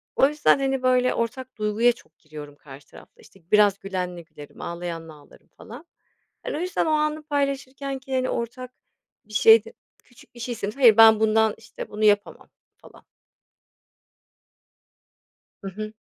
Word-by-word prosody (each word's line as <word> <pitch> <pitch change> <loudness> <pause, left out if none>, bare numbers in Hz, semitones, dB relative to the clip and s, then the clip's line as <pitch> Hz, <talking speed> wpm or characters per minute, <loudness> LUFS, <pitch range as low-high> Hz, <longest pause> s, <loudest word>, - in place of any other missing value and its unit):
o 270 - +5
yüzden, 295 -1 +2
hani, 270 -1 -1
böyle, 255 0 +2
ortak 245 +2 -5
duyguya 215 +3 +2
çok 240 - -17
giriyorum 150 -2 -12
karşı 140 -1 -15
tarafla. - - -18
İşte, 195 - -21
biraz 205 -2 +4
gülenle 180 -3 -5
gülerim, 150 -3 -14
ağlayanla 170 -2 -6
ağlarım 145 -1 -20
falan. 245 +9 -12 0.6
Hani, - - -4
o - - -4
yüzden 365 -2 -1
o - - -1
anı 305 0 0
paylaşırkenki, 275 -2 -3
hani, 255 0 0
ortak 250 +2 -5 0.5
bir 215 - -16
şeyde 225 +1 +5 0.3
küçük 245 0 -21
bir - - -13
şeysin. 235 -4 -4
Hayır, 235 -4 +5
ben 220 -1 +7
bundan, 220 0 +2
işte, 225 - -10
bunu 210 +1 -5
yapamam, 205 -1 0 0.3
falan. - - -19 2.6
Hı 195 - -7
hı. 215 +2 -7
225 Hz, 145 wpm, -23 LUFS, 200-260 Hz, 2.6 s, ben